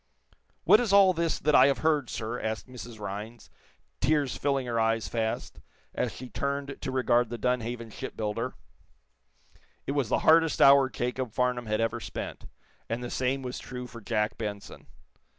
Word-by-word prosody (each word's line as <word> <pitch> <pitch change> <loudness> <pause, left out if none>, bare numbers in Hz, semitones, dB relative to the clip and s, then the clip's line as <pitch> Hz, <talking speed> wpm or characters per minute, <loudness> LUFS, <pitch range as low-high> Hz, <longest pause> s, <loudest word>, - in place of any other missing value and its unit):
"What - - +7
is 240 -5 0
all 195 -2 +7
this 165 -2 0
that 150 - +1
I 130 - +8
have 140 - +2
heard, 150 -6 +2
sir?" 115 +2 -4
asked 110 +2 -3
Mrs. 120 -3 -10
Rhinds, 105 +3 -7 0.5
tears 145 -1 +1
filling 140 -2 0
her 115 -1 -1
eyes 115 0 +1
fast, 110 -1 -3 0.3
as - - -1
she 130 - -9
turned 140 +2 -3
to 130 - -3
regard 120 -2 +2
the 120 - -4
Dunhaven 120 -1 -2
shipbuilder. 110 +4 -4 1.3
It - - -2
was 140 -5 0
the - - +2
hardest 165 -1 +5
hour 140 -1 +7
Jacob 125 -2 -3
Farnum 125 -1 0
had 110 0 0
ever 115 0 0
spent, - - -7 0.4
and 115 +2 -2
the 120 - -5
same 130 +1 -1
was 125 0 -5
true 125 -1 -7
for 115 -1 -11
Jack 105 -1 -1
Benson. 105 -2 -6
125 Hz, 170 wpm, -28 LUFS, 115-140 Hz, 1.3 s, I